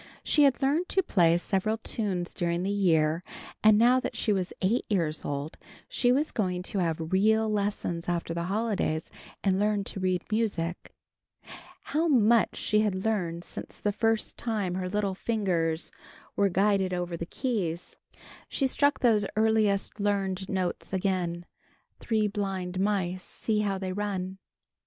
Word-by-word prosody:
She 295 -2 +4
had 275 0 +2
learned 305 +7 +1
to 385 - +2
play 170 - +4
several 195 +4 0
tunes 195 -6 -3
during 170 0 -1
the 195 - 0
year, 165 -4 +2 0.4
and 215 -1 +7
now 245 +3 +5
that - - -4
she 215 - +2
was 185 -2 -1
eight 210 +6 +1
years 165 -7 0
old, 145 +2 -4 0.3
she 245 -1 +2
was 285 +5 +1
going 180 -4 -1
to 195 - -3
have 165 -1 -1
real 220 +3 +3
lessons 200 -5 -2
after 170 -1 -1
the 170 0 -2
holidays 200 -5 -1 0.3
and 190 -1 +2
learn 210 -1 +1
to 195 - -5
read 185 -1 0
music. 195 -6 -2 0.9
How 320 +3 0
much 235 -5 +4
she 210 - +1
had 200 -2 0
learned 175 -6 -1
since - - -8
the 205 - 0
first 225 +1 0
time 210 -6 -2
her 185 0 -2
little 200 0 0
fingers 180 -6 -1 0.4
were 200 -1 +3
guided 190 0 +2
over 175 -1 -3
the 170 0 -5
keys. 190 - -3 0.5
She 275 - 0
struck 285 +2 +2
those 215 -5 +3
earliest 215 -2 +2
learned 195 -2 -1
notes 185 0 -2
again: 180 -3 -1 0.5
"Three 220 -2 +1
blind 190 -3 -3
mice! 190 -2 0
See 215 +3 -2
how 200 -2 0
they 190 -1 -3
run!" 190 -2 -3
195 Hz, 155 wpm, -28 LUFS, 180-215 Hz, 0.9 s, and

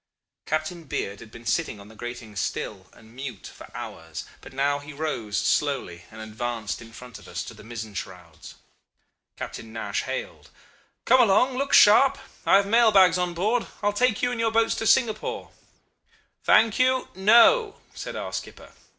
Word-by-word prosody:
Captain 155 +2 -3
Beard 100 -7 -4
had 115 - -12
been 115 +2 -13
sitting 105 - -1
on 100 - -13
the 110 - -15
gratings 115 -3 -7
still - - -4
and 110 +2 -19
mute 130 -6 -7
for - - -13
hours, 80 -1 -7 0.2
but - - -12
now 140 +2 0
he 145 +1 -10
rose 140 -9 -3
slowly 110 - -1
and 110 - -12
advanced 110 0 -4
in 115 0 -12
front 125 +1 -11
of - - -16
us, - - -4
to - - -9
the - - -14
mizzen 110 -2 -7
shrouds. 90 -4 -9 0.8
Captain 110 -1 -7
Nash 110 0 -3
hailed: - - -6 0.6
'Come 260 - +6
along! 245 +4 +3
Look 275 +2 -2
sharp. 260 +6 +7 0.3
I - - +6
have 200 0 +5
mail 230 +2 +4
bags 185 -3 +5
on 175 -1 -1
board. 215 +7 0 0.2
I - - -1
will 205 - +2
take 235 0 +1
you 245 - +2
and 245 - -4
your 230 0 +2
boats 225 0 +2
to 225 - -1
Singapore.' 225 -3 +1 0.9
"'Thank 225 0 +4
you! 255 0 +2
No!' 235 - +5 0.2
said - - -7
our - - -5
skipper. - - -7
155 Hz, 175 wpm, -25 LUFS, -, 0.9 s, sharp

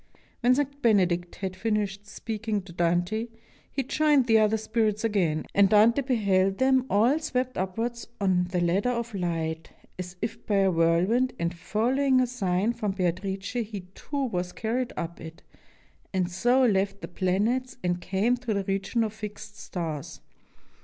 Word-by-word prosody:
] - - -34
When 250 +1 +4
St. 285 0 -2
Benedict 180 -7 +2
had 190 -2 -4
finished 205 0 -2
speaking 215 -2 -3
to 180 -2 -12
Dante, 175 +6 0 0.4
he 270 - -1
joined 295 0 +3
the 225 -2 +5
other 215 0 +3
spirits 215 -1 0
again, 180 -8 +1
and 200 -1 +5
Dante 220 +6 +5
beheld 195 -7 +1
them 260 0 +3
all 235 +9 +3
swept 255 -5 -2
upwards 230 +6 -3
on 185 -3 +2
the 180 0 -2
ladder 185 +7 +2
of 235 -1 -2
light, 165 -3 -2 0.3
as 180 0 -6
if 225 - -4
by 210 - +1
a 195 -1 +4
whirl 165 +1 +3
wind, 250 +5 +1
and 170 +1 -1
following 255 +9 +1
a 255 - +4
sign 210 -3 0
from 210 -4 -2
Beatrice 190 +1 -2
he 220 -4 -3
too 285 +5 -4
was 180 -6 -3
car 225 +2 -2
ried 255 -1 -2
up 170 0 -5
it, 160 0 -10 0.7
and 185 -2 0
so 245 +8 +3
left 200 -2 +1
the - - -5
planets 205 +8 0
and 175 0 0
came 200 +7 +1
to 240 -4 -2
the 200 - 0
region 195 +4 0
of 215 -1 -3
Fixed 210 -1 -8
Stars. 160 -5 -5
205 Hz, 170 wpm, -27 LUFS, 185-235 Hz, 0.7 s, the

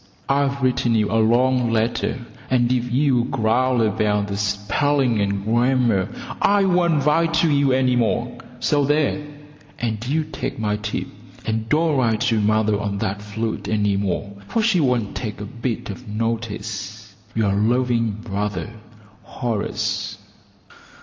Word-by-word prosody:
I've 140 0 +1
written 125 -2 +2
you 105 -2 +1
a 110 0 +3
long 125 +2 +3
letter, 115 +2 -1 0.2
and 125 -1 +2
if 125 -1 0
you 130 -2 +2
growl 120 +1 +1
about 105 -1 +1
the 100 - -2
spelling 105 +5 +1
and 100 0 -1
grammar 120 -4 +2 0.3
I 205 0 +4
won't 170 -6 +2
write 165 +2 +3
to 160 0 +3
you 140 -1 +3
any 130 -1 +3
more, 120 -2 0 0.2
so 145 -1 +2
there, 150 +1 +1 0.5
and 110 -2 -2
you 155 +4 +1
take 155 -2 -5
my 105 -1 -1
tip 105 0 -3 0.4
and 110 0 -2
don't 155 0 +2
write 115 -4 +1
to 110 -2 +2
mother 110 0 +2
on 100 -1 -2
that 100 +1 -2
flute 110 +2 -4
any 105 -2 +1
more, 100 0 -2
for 225 - 0
she 210 -5 +3
won't 125 -8 0
take 110 -4 -4
a 105 - -5
bit 115 0 -4
of 100 - -10
notice. 110 -1 -4 0.2
Yr 105 -3 +2
loving 115 +1 +1
brother, 100 -3 -3 0.5
Horace. 105 -3 -3
115 Hz, 145 wpm, -22 LUFS, 105-130 Hz, 0.5 s, I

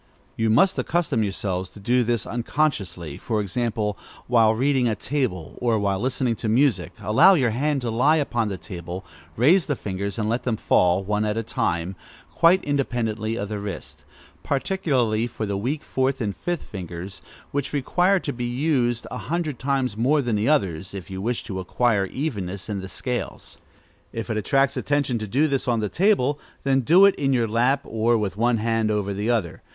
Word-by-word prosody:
You 115 0 +1
must 185 - +4
accustom 160 -9 0
yourselves 95 -2 -2
to 105 - -14
do 120 +5 +2
this 115 -2 0
unconsciously. 115 - -2
For 110 -2 -2
example, 105 0 -2 0.3
while 115 -2 +4
reading, 130 +1 +2
at 110 -3 -1
table, 125 - -2
or 120 -2 +2
while 100 -2 0
listening 125 0 0
to 110 - -2
music, 130 +3 +2
allow 110 - +6
your 130 -8 +2
hand 140 +4 0
to 120 -2 -2
lie 130 +7 +4
upon 120 -7 0
the 100 -2 -3
table, 90 0 -7 0.3
raise 160 - +4
the 145 - 0
fingers, 100 -1 -4
and 105 -2 -1
let 115 +3 0
them 115 -3 -1
fall, 90 0 +3
one 105 +2 0
at 105 0 -1
a 115 - -1
time, 90 -3 -2 0.4
quite 170 +3 +4
independently 115 -6 -1
of 100 -2 -3
the 105 -1 -3
wrist; 100 -2 -7 0.4
particularly 135 - 0
the 110 -4 -3
weak 130 +10 -2
fourth 135 0 0
and 105 -5 -2
fifth 175 -2 -3
fingers, 90 0 -7 0.3
which 145 -1 -2
require 175 +7 +2
to 145 - -3
be 120 0 -4
used 120 -2 0
a - - -4
hundred 160 -6 -2
times 135 -5 0
more 135 +6 +2
than 120 -3 0
the 105 +5 +1
others, 95 - 0
if 95 0 -8
you 95 0 -5
wish 120 +3 -1
to 95 -3 -5
acquire 100 +1 +1
evenness 100 - -4
in 100 -2 -2
the 95 0 -7
scales. 120 +6 -5 0.5
If 115 +1 -4
it 110 - -1
attracts 135 +6 +2
attention 140 -5 0
to 110 - -4
do 135 +9 +2
this 135 -3 -1
on 120 -2 +2
the 105 -1 -1
table, 150 - +2 0.2
then 135 -1 +2
do 175 +10 +6
it 200 - +6
in 135 -2 +1
your 120 -3 +2
lap, 125 +5 +2
or 115 +1 +1
with 100 -3 -2
one 120 +2 +2
hand 115 0 0
over 105 -2 -1
the 105 +4 -2
other. 110 -9 -1
115 Hz, 190 wpm, -24 LUFS, 105-135 Hz, 0.5 s, allow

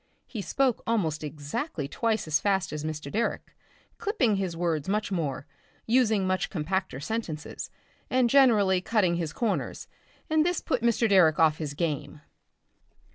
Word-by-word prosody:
He 220 - -6
spoke 260 +3 +1
almost 165 -10 0
exactly 150 - -4
twice 220 +9 -1
as 155 -1 +2
fast 190 -5 0
as 150 0 -4
Mr. 150 -2 -5
Direck, 230 +2 -2 0.5
clipping 295 - +1
his 185 -4 -2
words 165 -2 -1
much 210 0 -1
more, 150 -7 -2 0.4
using 225 -4 +3
much 185 0 0
compacter 185 -3 -2
sentences, 160 -3 -4 0.4
and 255 -1 +3
generally 220 -8 +4
cutting 185 -4 +1
his 165 -3 -2
corners, 225 -4 -2 0.4
and 310 0 +3
this 355 0 0
put 245 - -1
Mr. 235 0 +2
Direck 180 -7 +5
off 160 -1 +3
his 145 -3 -4
game. 150 -2 -3
190 Hz, 145 wpm, -27 LUFS, 155-230 Hz, 0.5 s, Direck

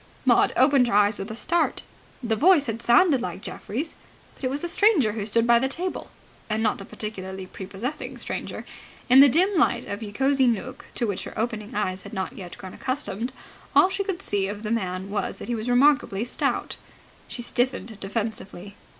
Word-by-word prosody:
Maud - - +5
opened 275 -4 +5
her 200 - 0
eyes 205 0 +4
with 195 - -5
a 220 - -5
start. 335 +7 0 0.4
The 225 -2 +1
voice 320 - +5
had 230 -2 -3
sounded 260 +3 +4
like 220 - -5
Geoffrey's. 285 +10 -5 0.4
But - - -18
it 255 - +1
was 280 +4 -3
a - - 0
stranger 345 - +4
who 210 -1 -4
stood 230 +2 +2
by 235 0 +5
the 265 - +1
table. 355 +7 -4 0.4
And 220 +1 0
not 215 -2 0
a - - -8
particularly 190 -3 -6
prepossessing 195 +9 -6
stranger. - - -5 0.5
In 260 - +9
the 280 0 +9
dim 365 +9 +3
light - - +2
of 200 +2 -5
Ye 210 -2 -6
Cosy 270 +3 +2
Nooke, 245 +3 -2
to 240 - 0
which 200 -4 -3
her - - -9
opening 220 0 -3
eyes 190 -3 -1
had - - -11
not 190 0 -3
yet 180 -3 -9
grown 185 -1 -9
accustomed, 245 -3 -3 0.4
all 375 - +7
she 395 +1 -1
could 390 -2 -4
see 195 -1 0
of 205 +2 -6
the 215 - -3
man 190 -3 -2
was 205 - -2
that - - -8
he - - 0
was 225 +1 -3
remarkably 250 -5 +3
stout. 245 - -1 0.5
She 240 - -4
stiffened 240 -3 -1
defensively. 200 -2 -5
230 Hz, 200 wpm, -25 LUFS, 205-270 Hz, 0.5 s, In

